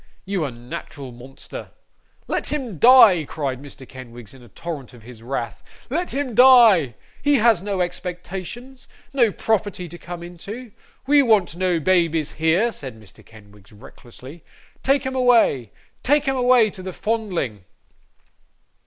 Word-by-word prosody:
you 195 -3 -2
unnatural 125 +1 -8
monster.' 125 +3 -11 0.6
'Let - - -3
him 250 - -4
die,' 230 -9 +7
cried 140 -3 -4
Mr. 135 -2 -12
Kenwigs, 120 -3 -11
in 130 - -15
the 120 - -15
torrent 150 -7 -8
of 115 - -16
his 115 -1 -13
wrath. 115 -3 -5 0.3
'Let 350 +5 -2
him 275 -2 -3
die! 225 - +6 0.3
He 290 0 +3
has 230 -6 +4
no 195 -1 -2
expectations, 185 +9 -6 0.3
no 240 -6 +3
property 205 -3 -2
to 170 +1 -11
come 175 +1 -8
into. 205 +8 -9 0.3
We 290 +1 +5
want 215 -10 +2
no 180 -1 0
babies 165 -2 +1
here,' 165 +9 +1
said 130 - -9
Mr. 105 -3 -16
Kenwigs 105 -2 -18
recklessly. 130 +6 -14 0.4
'Take 275 0 +1
'em 265 - -3
away, 235 - +3 0.3
take 290 +2 +2
'em 270 - +1
away 250 -4 +4
to 190 - -10
the 185 0 -7
Fondling! 180 - -3
180 Hz, 145 wpm, -22 LUFS, -, 0.6 s, die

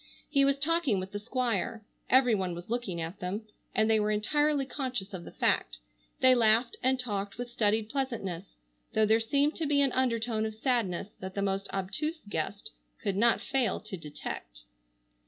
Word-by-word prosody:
He 280 -2 +3
was 275 0 +3
talking 295 - +2
with 185 +1 -5
the 205 - -4
Squire. 225 -2 -1 0.2
Every 255 -2 +5
one 185 -4 0
was 175 +5 -9
looking 235 -8 -2
at 165 +4 -5
them, 190 +5 -3 0.3
and 220 - +3
they 220 -1 +4
were 210 0 +1
entirely 285 +7 +2
conscious 255 -8 -4
of 175 -2 -6
the - - -9
fact. - - +1 0.4
They 260 0 +7
laughed 235 0 +4
and 260 0 +2
talked 200 -5 -3
with 245 0 -5
studied 215 -2 +1
pleasantness, 220 -10 -3 0.4
though 220 - +5
there 220 +1 +4
seemed 280 +6 +2
to 320 - -1
be 285 0 +3
an 275 -2 +4
undertone 230 -3 +1
of 220 - -7
sadness 220 -6 0
that 190 0 -7
the 200 - 0
most 195 0 -1
obtuse 300 - -3
guest 200 +2 -3 0.3
could 200 - 0
not 230 +4 +4
fail 265 -4 0
to 215 -2 -6
detect. 145 - -7
220 Hz, 180 wpm, -30 LUFS, 195-260 Hz, 0.4 s, They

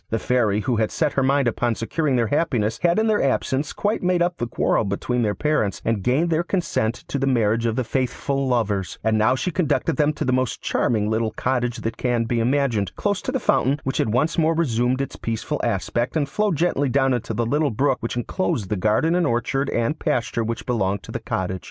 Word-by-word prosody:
The 115 - 0
Fairy, 110 -4 +1
who 120 +2 0
had 110 -1 +1
set 155 -3 0
her 135 - +1
mind 135 0 +2
upon 120 0 0
securing 140 +5 -1
their 120 -2 +2
happiness, 120 -9 0
had 170 0 +3
in 220 - +2
their 215 -2 +2
absence 135 +2 0
quite 210 +2 -1
made 180 -1 +2
up 175 0 -1
the 120 - -2
quarrel 115 - +1
between 110 +5 -1
their 105 -3 0
parents, 150 -10 0
and 115 -3 0
gained 140 - +1
their 160 +1 +2
consent 165 - -1
to 140 - -2
the 135 - 0
marriage 115 -2 +2
of 115 - -1
the 130 - 0
faithful 135 +2 -1
lovers; 105 -7 -1
and 110 0 +2
now 110 +4 +3
she 180 +7 -2
conducted 165 -3 0
them 150 0 +3
to - - -3
the 130 - +1
most 130 -2 0
charming 110 -3 0
little 110 +1 0
cottage 120 +1 -1
that 115 - -3
can 120 -2 0
be 115 +1 -1
imagined, 115 -6 0
close 205 -2 -1
to - - -3
the 265 - -1
fountain, 140 - +2
which 135 - -2
had 110 - +1
once 155 +9 +1
more 165 0 +3
resumed 125 -4 +1
its 135 - -5
peaceful 115 -1 -3
aspect, 120 +6 -1
and 145 -2 0
flowed 210 +4 0
gently 145 -3 +1
down 135 0 +2
into 115 -2 -3
the 120 +2 0
little 145 +5 +1
brook 130 +3 +1
which 115 +1 -3
enclosed 120 - -2
the 105 - 0
garden 110 - +2
and 175 -2 +2
orchard 135 +3 0
and 120 +7 -1
pasture 120 -1 -1
which 115 +1 -4
belonged 100 -5 -1
to - - -9
the - - -3
cottage. 95 0 -3
125 Hz, 225 wpm, -22 LUFS, 115-150 Hz, -, had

